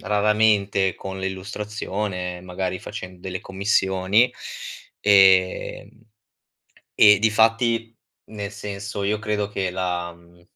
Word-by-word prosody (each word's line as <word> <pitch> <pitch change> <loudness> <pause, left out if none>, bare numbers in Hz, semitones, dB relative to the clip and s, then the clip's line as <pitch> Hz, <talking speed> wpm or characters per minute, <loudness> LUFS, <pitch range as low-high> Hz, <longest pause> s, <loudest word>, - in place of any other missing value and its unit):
raramente 105 -2 +2
con 95 0 -7
l'illustrazione, 95 -1 -4
magari 90 0 -4
facendo 90 -3 -8
delle 95 0 -5
commissioni, 95 +3 +1 0.7
ehm, 95 -2 +4 1.1
e 105 -2 +7
difatti 115 +1 +2 0.4
nel 105 -2 -6
senso 100 0 -6
io 105 +2 0
credo 105 -1 -2
che 95 -2 -2
la 90 -1 -3
mhmm, 85 0 -22
100 Hz, 95 wpm, -23 LUFS, 95-105 Hz, 1.1 s, e